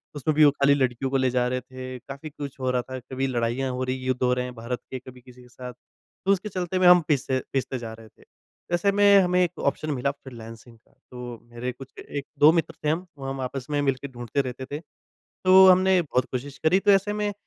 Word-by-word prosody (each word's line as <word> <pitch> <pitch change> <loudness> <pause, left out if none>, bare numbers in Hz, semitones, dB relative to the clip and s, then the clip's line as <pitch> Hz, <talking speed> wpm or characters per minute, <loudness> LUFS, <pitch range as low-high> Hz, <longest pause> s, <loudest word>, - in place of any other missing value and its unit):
उसमें 145 +2 0
भी 155 - +7
वो 145 - +6
खाली 140 0 +3
लड़कियों 130 -1 0
को 135 - +2
ले 130 -1 +2
जा 125 0 +1
रहे 125 0 -2
थे। 130 0 -8
काफ़ी 140 +5 -9
कुछ 140 -2 -8
हो 130 -1 -1
रहा 125 - +1
था, 130 +1 -7
कभी 130 +2 -3
लड़ाइयाँ 125 +1 -1
हो 125 +1 -3
रही 130 0 -2
हैं, 130 - -7
युद्ध 130 -1 -1
हो 125 0 +3
रहे 125 0 -1
हैं 125 - -7
भारत 120 +2 -4
के 130 - -4
कभी 125 0 -13
किसी 125 0 -16
के 125 - -16
साथ, 125 0 -9
तो 185 +9 -6
उसके 200 +2 0
चलते 185 -1 -3
हुए 185 -1 +4
हम 180 0 +8
पिस 145 -3 +1
पिसते 130 0 -2
जा 115 -1 -7
रहे 110 0 -13
थे। - - -24
तो 175 - -8
ऐसे 200 +3 +2
में 200 0 +6
हमें 180 0 +2
एक 175 - -3
ऑप्शन 155 +2 -1
मिला 140 0 0
फ्रीलांसिंग 115 -3 -12
का 110 - -33 0.2
तो 125 -2 -8
मेरे 120 +2 -4
कुछ 130 +2 -13
1-2 145 +1 +2
मित्र 165 -1 0
थे - - +3
हम, 165 +4 -1
वो 135 - -8
हम 135 0 -4
आपस 130 0 -5
में 145 -1 0
मिलके 135 -1 -1
ढूँढते 120 +1 -2
रहते 130 0 -6
थे, - - -4 0.5
तो 190 0 +5
हमने 185 0 +5
बहुत 130 -6 0
कोशिश 135 +2 -5
करी 180 +4 +5
तो 205 +1 +4
ऐसे 195 +1 +3
में 210 -1 -2
135 Hz, 245 wpm, -25 LUFS, 125-155 Hz, 0.5 s, हम